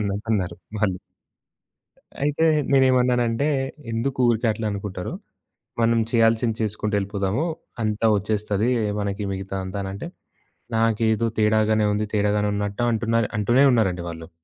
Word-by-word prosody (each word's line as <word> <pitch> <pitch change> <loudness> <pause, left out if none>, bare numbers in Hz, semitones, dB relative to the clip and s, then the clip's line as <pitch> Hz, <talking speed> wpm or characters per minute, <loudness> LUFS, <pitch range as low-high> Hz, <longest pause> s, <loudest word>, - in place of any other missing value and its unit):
అన్న 105 - -1
అన్నట్టన్నారు 105 -4 -2 0.2
వాళ్ళు. 95 -3 0 1.3
అయితే 150 +2 +2 0.3
నేనేమన్నానంటే, 125 -1 +3 0.4
"ఎందుకు 120 +4 -2
ఊరికే 115 +1 0
అట్లా 110 +1 -4
అనుకుంటారు, 100 -2 -5 0.7
మనం 115 0 +3
చేయాల్సింది 115 -1 +2
చేసుకుంటూ 105 0 -2
ఎళ్ళిపోదాము, 100 - -1 0.4
అంతా 105 +1 0
ఒచ్చేస్తది. 105 +2 -1 0.3
మనకి 100 0 -2
మిగతా 95 0 -5
అంతా" 95 +2 -5
అనంటే, 95 +1 -6 0.7
"నాకేదో 115 0 +2
తేడాగానే 110 0 +3
ఉంది, 105 +1 -1
తేడాగానే 105 0 +1
ఉన్నట్టు" 100 +3 -2
అంటున్నారు 115 0 0
అంటూనే 120 +6 +4
ఉన్నారండి 95 -7 +1
వాళ్ళు. 80 0 -8
110 Hz, 115 wpm, -23 LUFS, 100-115 Hz, 1.3 s, అంటూనే